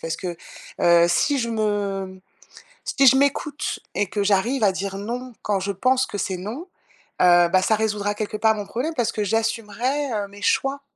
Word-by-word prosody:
Parce 165 Hz, -, -3 dB
que, 175 Hz, -2 st, -5 dB, 0.4 s
heu, 170 Hz, 0 st, +5 dB
si 280 Hz, -, +2 dB
je 235 Hz, -2 st, -2 dB
me 200 Hz, -3 st, -2 dB, 0.7 s
si 275 Hz, -, +2 dB
je 265 Hz, -, +7 dB
m'écoute 285 Hz, +1 st, -1 dB
et 205 Hz, -, 0 dB
que 205 Hz, +1 st, -2 dB
j'arrive 215 Hz, +5 st, +1 dB
à 195 Hz, -, +4 dB
dire: 195 Hz, +1 st, -4 dB
«non» 245 Hz, +5 st, -5 dB
quand 200 Hz, -2 st, 0 dB
je 200 Hz, +1 st, -2 dB
pense 255 Hz, +6 st, +1 dB
que -, -, -6 dB
c'est 190 Hz, -2 st, -2 dB
non, 235 Hz, -, -7 dB, 0.5 s
heu, 175 Hz, -1 st, +6 dB
bah, 185 Hz, +1 st, +4 dB
ça 220 Hz, -, +2 dB
résoudra 210 Hz, -1 st, -1 dB
quelque 215 Hz, 0 st, -4 dB
part 220 Hz, 0 st, +3 dB
mon 205 Hz, -, -4 dB
problème 275 Hz, +10 st, -3 dB
parce 235 Hz, -5 st, 0 dB
que 210 Hz, -, -2 dB
j'assumerais, 230 Hz, +6 st, -1 dB
heu, 205 Hz, -2 st, -2 dB
mes 205 Hz, +1 st, -14 dB
choix. 270 Hz, +6 st, +1 dB
210 Hz, 190 wpm, -23 LUFS, 195-250 Hz, 0.7 s, je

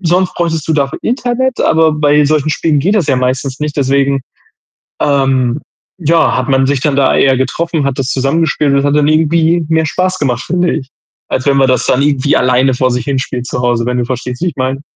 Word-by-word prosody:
sonst 180 Hz, +2 st, +1 dB
bräuchtest 165 Hz, -3 st, -2 dB
du -, -, +2 dB
dafür 140 Hz, -2 st, -1 dB
Internet, 250 Hz, +1 st, -1 dB
aber 160 Hz, 0 st, +3 dB
bei 150 Hz, 0 st, +2 dB
solchen 155 Hz, 0 st, +1 dB
Spielen 155 Hz, -1 st, 0 dB
geht 185 Hz, +9 st, +1 dB
das 185 Hz, -8 st, 0 dB
ja 135 Hz, -, +2 dB
meistens 130 Hz, +1 st, -2 dB
nicht, 150 Hz, -1 st, -4 dB
deswegen, 140 Hz, 0 st, +1 dB, 0.8 s
ähm, 135 Hz, -3 st, +1 dB, 0.4 s
ja, 165 Hz, -1 st, +2 dB
hat -, -, -2 dB
man 135 Hz, 0 st, +2 dB
sich 140 Hz, -2 st, 0 dB
dann 145 Hz, -1 st, 0 dB
da 140 Hz, -1 st, +2 dB
eher 135 Hz, -1 st, +3 dB
getroffen, 160 Hz, +4 st, -2 dB
hat 140 Hz, -2 st, -2 dB
das 135 Hz, -2 st, -2 dB
zusammengespielt 145 Hz, +1 st, 0 dB
und 140 Hz, -, +3 dB
es 140 Hz, -, -1 dB
hat 145 Hz, 0 st, +1 dB
dann 150 Hz, -1 st, +2 dB
irgendwie 160 Hz, +2 st, +2 dB
mehr 160 Hz, 0 st, +2 dB
Spaß 185 Hz, +3 st, -1 dB
gemacht, 130 Hz, -3 st, -1 dB
finde 180 Hz, 0 st, 0 dB
ich, 135 Hz, -4 st, -6 dB, 0.4 s
als 130 Hz, -, -2 dB
wenn 140 Hz, -1 st, +2 dB
man 135 Hz, -1 st, +3 dB
das 125 Hz, -1 st, +1 dB
dann 130 Hz, -, +1 dB
irgendwie 140 Hz, 0 st, +1 dB
alleine 130 Hz, +1 st, +2 dB
vor 130 Hz, 0 st, 0 dB
sich 125 Hz, 0 st, -2 dB
hin 140 Hz, -2 st, -1 dB
spielt 125 Hz, -1 st, -4 dB
zu 125 Hz, -, -4 dB
Hause, 120 Hz, -1 st, 0 dB
wenn 125 Hz, 0 st, -1 dB
du 120 Hz, -, -1 dB
verstehst, 125 Hz, +1 st, -5 dB
wie 180 Hz, -, 0 dB
ich 165 Hz, -, -4 dB
meine. 130 Hz, +1 st, -2 dB
140 Hz, 225 wpm, -13 LUFS, 130-160 Hz, 0.8 s, aber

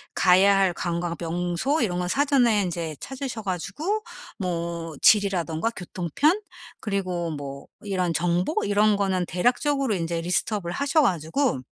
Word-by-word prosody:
가야 195 Hz, +2 st, +5 dB
할 190 Hz, -2 st, +3 dB
관광 170 Hz, 0 st, -2 dB
명소 175 Hz, -, -1 dB
이런 180 Hz, -6 st, 0 dB
거 180 Hz, -, -1 dB
사전에 250 Hz, -3 st, +3 dB
인제 170 Hz, -3 st, -3 dB
찾으셔 265 Hz, -4 st, -5 dB
가지고 205 Hz, -, -2 dB, 0.4 s
뭐 170 Hz, -3 st, -3 dB
지리라든가 195 Hz, -3 st, +3 dB
교통편 195 Hz, -, 0 dB, 0.4 s
그리고 185 Hz, -5 st, -2 dB
뭐 140 Hz, -2 st, -7 dB
이런 185 Hz, -4 st, -1 dB
정보 175 Hz, +3 st, 0 dB
이런 205 Hz, +1 st, +3 dB
거는 190 Hz, -3 st, 0 dB
대략적으로 255 Hz, -, +1 dB
인제 165 Hz, -1 st, -2 dB
리스트 180 Hz, +5 st, 0 dB
업을 175 Hz, -4 st, -4 dB
하셔 280 Hz, -, +2 dB
가지고 180 Hz, -, +1 dB
185 Hz, 300 characters per minute, -25 LUFS, 170-225 Hz, 0.4 s, 가야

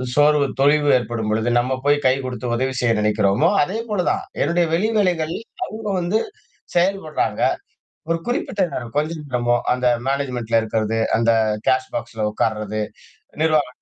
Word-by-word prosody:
சோர்வு 145 Hz, -1 st, +4 dB, 0.2 s
தொய்வு 145 Hz, +1 st, +4 dB
ஏற்படும்பொழுது, 115 Hz, -1 st, -1 dB
நம்ம 130 Hz, +1 st, -1 dB
போய் 145 Hz, 0 st, +4 dB
கை 130 Hz, -, +4 dB
குடுத்து 125 Hz, -1 st, -4 dB
உதவி 130 Hz, +2 st, -1 dB
செய்ய 120 Hz, -, +3 dB
நினைக்கிறோமோ! 105 Hz, -, +2 dB
அதேபோல 210 Hz, -1 st, -2 dB
தான். -, -, -2 dB, 0.2 s
என்னுடைய 170 Hz, 0 st, +2 dB
வெளி 205 Hz, +7 st, +2 dB
வேலைகள்ல 175 Hz, -5 st, +1 dB, 0.3 s
அவுங்க 220 Hz, 0 st, -7 dB
வந்து 180 Hz, +5 st, +1 dB, 0.6 s
செயல்படுறாங்க. 175 Hz, -3 st, 0 dB, 0.7 s
ஒரு 165 Hz, -, +1 dB
குறிப்பிட்ட 230 Hz, -4 st, -1 dB
நேரம். 120 Hz, -2 st, -5 dB
கொஞ்ச 155 Hz, +2 st, +1 dB
நேரமோ 120 Hz, -3 st, +1 dB, 0.2 s
அந்த 125 Hz, 0 st, 0 dB, 0.2 s
மேனேஜ்மென்ட்ல 125 Hz, -5 st, 0 dB
இருக்கிறது, 110 Hz, 0 st, -1 dB, 0.2 s
அந்த 115 Hz, 0 st, +3 dB, 0.4 s
கேஷ் 130 Hz, 0 st, +2 dB
பாக்ஸ்ல 115 Hz, -2 st, -3 dB
உட்கார்றது, 110 Hz, -1 st, -1 dB, 0.6 s
நிர்வாக 155 Hz, -3 st, +3 dB
130 Hz, 135 wpm, -21 LUFS, 115-165 Hz, 0.7 s, சோர்வு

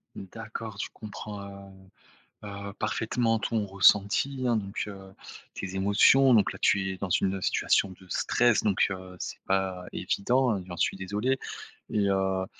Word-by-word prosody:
N 95 Hz, -, -8 dB
d'accord, 110 Hz, -1 st, -7 dB
je -, -, -3 dB
comprends, 105 Hz, -1 st, -8 dB, 1.0 s
heu -, -, -6 dB
heu, 100 Hz, 0 st, -7 dB
parfaitement 115 Hz, +1 st, 0 dB
ton 110 Hz, -1 st, -1 dB
ressenti, 105 Hz, +7 st, +3 dB
hein, 120 Hz, -2 st, +2 dB
donc, 100 Hz, 0 st, -3 dB
heu, 95 Hz, -2 st, -10 dB, 0.4 s
tes 95 Hz, -1 st, -6 dB
émotions 105 Hz, +7 st, +5 dB
donc 105 Hz, -, +3 dB
là, -, -, -10 dB
tu 95 Hz, -1 st, +2 dB
es 95 Hz, -, -4 dB
dans 95 Hz, -1 st, -5 dB
une 95 Hz, +2 st, +1 dB
situation 100 Hz, -, +2 dB
de 95 Hz, -, -16 dB
stress, 120 Hz, +6 st, +2 dB
donc, 100 Hz, -3 st, +3 dB
heu, 95 Hz, -1 st, -7 dB
c'est -, -, -6 dB
pas 95 Hz, -1 st, -1 dB
évident, 120 Hz, -2 st, +1 dB
j'en 85 Hz, -1 st, -7 dB
suis -, -, 0 dB
désolé 105 Hz, +8 st, -1 dB, 0.5 s
et 105 Hz, -2 st, +1 dB
heu, 95 Hz, -1 st, +1 dB
100 Hz, 155 wpm, -28 LUFS, 95-110 Hz, 1.0 s, émotions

